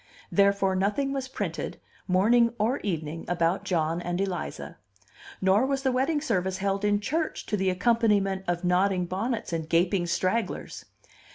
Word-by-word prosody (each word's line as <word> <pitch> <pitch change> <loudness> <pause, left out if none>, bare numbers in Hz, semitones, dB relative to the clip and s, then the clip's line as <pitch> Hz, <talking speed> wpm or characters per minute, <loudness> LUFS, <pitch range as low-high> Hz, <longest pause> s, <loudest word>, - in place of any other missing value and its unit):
Therefore 200 -1 +3
nothing 210 +9 0
was 270 -1 -3
printed, 260 - -4 0.3
morning 230 +6 +3
or 225 +6 +1
evening, 165 -4 -3
about 175 +2 +1
John 165 -3 0
and 175 0 -3
Eliza. 185 - -4 0.6
Nor 195 +7 +3
was 270 -1 -1
the 265 - +2
wedding 275 +4 +1
service 190 - -1
held 195 +1 -1
in 205 0 +2
church 310 +9 -2
to - - -1
the 190 -2 +1
accompaniment 200 -1 +2
of 175 0 -1
nodding 180 +1 +2
bonnets 210 +3 -3
and 160 -1 -3
gaping 175 +1 +2
stragglers. 185 +6 -2
195 Hz, 150 wpm, -27 LUFS, 180-230 Hz, 0.6 s, Therefore